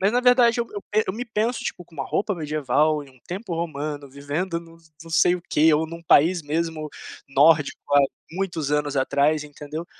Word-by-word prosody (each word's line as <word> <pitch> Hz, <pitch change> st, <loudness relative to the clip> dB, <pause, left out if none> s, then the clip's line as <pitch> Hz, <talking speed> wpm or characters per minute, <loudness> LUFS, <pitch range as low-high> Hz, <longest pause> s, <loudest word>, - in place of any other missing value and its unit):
mas 195 Hz, +2 st, +3 dB
na 245 Hz, -, +3 dB
verdade 245 Hz, -2 st, +5 dB
eu 235 Hz, -, -2 dB
eu 205 Hz, -1 st, -6 dB
e 215 Hz, -, +4 dB
eu 185 Hz, -, -1 dB
me 245 Hz, +3 st, -4 dB
penso, 225 Hz, +2 st, -1 dB
tipo, 180 Hz, -, -4 dB
com 170 Hz, -, -21 dB
uma 135 Hz, -3 st, -3 dB
roupa 205 Hz, +7 st, -1 dB
medieval, 150 Hz, -1 st, +1 dB
em 135 Hz, -, -17 dB
um 130 Hz, -1 st, -23 dB
tempo 185 Hz, 0 st, -5 dB
romano, 150 Hz, -3 st, -4 dB
vivendo 145 Hz, +6 st, -3 dB
num 165 Hz, 0 st, -16 dB, 0.3 s
num 165 Hz, -, -12 dB
sei 175 Hz, +2 st, +4 dB
o 180 Hz, -, -6 dB
quê, 155 Hz, +2 st, +4 dB
ou 155 Hz, +2 st, +2 dB
num 170 Hz, +1 st, -9 dB
país 170 Hz, +2 st, +4 dB
mesmo 155 Hz, +1 st, -2 dB, 0.4 s
nórdico, 145 Hz, +2 st, +4 dB, 0.2 s
há 145 Hz, -, +8 dB, 0.3 s
muitos 170 Hz, -5 st, -3 dB
anos 145 Hz, -1 st, 0 dB
atrás, 145 Hz, +3 st, +2 dB
entendeu, 150 Hz, +3 st, -7 dB
160 Hz, 205 wpm, -24 LUFS, 145-180 Hz, 0.4 s, há